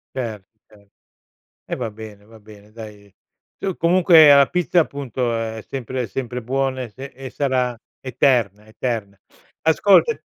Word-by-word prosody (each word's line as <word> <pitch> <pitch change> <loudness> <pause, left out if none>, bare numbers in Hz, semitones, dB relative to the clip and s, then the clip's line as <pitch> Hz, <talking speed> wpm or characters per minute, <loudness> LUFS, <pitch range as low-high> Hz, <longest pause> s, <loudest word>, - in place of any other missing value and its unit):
Certo, 110 -6 -5 0.2
cer 100 -2 -22 0.8
e - - -2
va 120 -4 -4
bene, 105 -1 -12
va 110 +1 -17
bene 105 -1 -17
dai. 105 -3 -12 0.5
Tu 190 -2 -3
comunque 170 -2 +6
la 140 -1 +6
pizza 180 +2 0
appunto, 130 -5 -2
è 110 -1 -4
sempre 130 -1 -4
è - - -4
sempre 125 +3 -5
buona 130 +2 -2
e 125 - -6
se 130 +6 -10
e 135 -1 -10
sarà 130 -3 -1 0.2
eterna, 120 -6 0
eterna. 110 -3 -4 0.4
Ascolta 195 - +4
125 Hz, 145 wpm, -21 LUFS, 110-135 Hz, 0.8 s, comunque